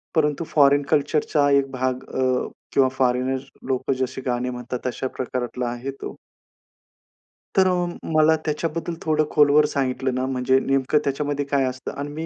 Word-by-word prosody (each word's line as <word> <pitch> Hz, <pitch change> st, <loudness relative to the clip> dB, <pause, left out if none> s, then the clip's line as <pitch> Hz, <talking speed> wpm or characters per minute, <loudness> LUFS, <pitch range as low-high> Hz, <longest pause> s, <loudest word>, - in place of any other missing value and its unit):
परंतु 150 Hz, +1 st, +1 dB
फॉरेन 145 Hz, -1 st, +4 dB
कल्चरचा 145 Hz, 0 st, +2 dB
एक 140 Hz, -1 st, +3 dB
भाग 130 Hz, 0 st, -2 dB
अ, 130 Hz, -1 st, +1 dB, 0.3 s
किंवा 135 Hz, -1 st, +4 dB
फॉरेनर 130 Hz, +1 st, +1 dB, 0.3 s
लोकं 130 Hz, 0 st, 0 dB
जसे 130 Hz, 0 st, -2 dB
गाणे 125 Hz, 0 st, -1 dB
म्हणतात, 125 Hz, 0 st, -5 dB
तशा 130 Hz, +1 st, -2 dB
प्रकारातला 125 Hz, -1 st, -3 dB
आहे 120 Hz, +3 st, -4 dB
तो. -, -, -6 dB, 1.4 s
तर 190 Hz, -1 st, +6 dB, 0.5 s
मला 155 Hz, +1 st, +5 dB
त्याच्याबद्दल 165 Hz, +2 st, -2 dB
थोडं 155 Hz, -1 st, +2 dB
खोलवर 150 Hz, 0 st, +5 dB
सांगितलं 130 Hz, -3 st, -1 dB
ना, 130 Hz, -, 0 dB
म्हणजे 130 Hz, 0 st, +2 dB
नेमकं 135 Hz, +2 st, +1 dB
त्याच्यामध्ये 145 Hz, 0 st, -1 dB
काय 140 Hz, -1 st, +1 dB
असतं 130 Hz, 0 st, -4 dB
आणि 145 Hz, +1 st, -4 dB
मी 160 Hz, +2 st, -4 dB
135 Hz, 145 wpm, -23 LUFS, 130-150 Hz, 1.4 s, तर